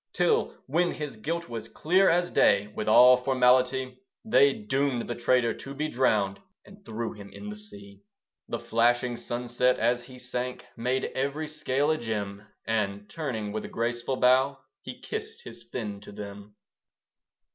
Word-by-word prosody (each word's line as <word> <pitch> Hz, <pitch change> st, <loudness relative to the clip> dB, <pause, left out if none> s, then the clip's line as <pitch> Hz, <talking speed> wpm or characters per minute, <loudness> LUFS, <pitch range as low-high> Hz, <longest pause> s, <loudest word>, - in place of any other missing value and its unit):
Till, -, -, +1 dB
when 175 Hz, +5 st, +1 dB
his 150 Hz, -4 st, -5 dB
guilt 165 Hz, +10 st, -3 dB
was 115 Hz, -2 st, -6 dB
clear 185 Hz, +10 st, +3 dB
as 175 Hz, +1 st, +2 dB
day, 100 Hz, +1 st, +4 dB
With 105 Hz, -, -5 dB
all 125 Hz, +3 st, +8 dB
formality 130 Hz, 0 st, +2 dB, 0.3 s
They 140 Hz, -10 st, +5 dB
doomed 130 Hz, +2 st, -1 dB
the 120 Hz, -, -2 dB
traitor 120 Hz, 0 st, +2 dB
to 140 Hz, 0 st, -9 dB
be 155 Hz, +2 st, -2 dB
drowned, 105 Hz, -7 st, +1 dB, 0.3 s
And 200 Hz, 0 st, -16 dB
threw 115 Hz, -, -4 dB
him 100 Hz, -1 st, -11 dB
in 210 Hz, 0 st, -8 dB
the -, -, -7 dB
sea. 100 Hz, -, -11 dB, 0.5 s
The -, -, -2 dB
flashing 120 Hz, +2 st, +1 dB
sunset, 120 Hz, +1 st, 0 dB
as 120 Hz, +2 st, +1 dB
he 130 Hz, 0 st, -12 dB
sank, 125 Hz, 0 st, -4 dB
Made 125 Hz, +3 st, -1 dB
every 140 Hz, +4 st, -2 dB
scale 150 Hz, -1 st, 0 dB
a 155 Hz, -, 0 dB
gem; 105 Hz, -2 st, -4 dB, 0.2 s
And, 105 Hz, -2 st, -1 dB
turning 120 Hz, -10 st, -3 dB
with 110 Hz, +1 st, -3 dB
a -, -, -6 dB
graceful 120 Hz, +2 st, -2 dB
bow, 130 Hz, +2 st, +4 dB, 0.2 s
He -, -, -8 dB
kissed 440 Hz, +1 st, -6 dB
his -, -, -10 dB
fin 105 Hz, -5 st, -5 dB
to 105 Hz, -, -11 dB
them. 100 Hz, 0 st, -9 dB
125 Hz, 160 wpm, -27 LUFS, 110-140 Hz, 0.5 s, all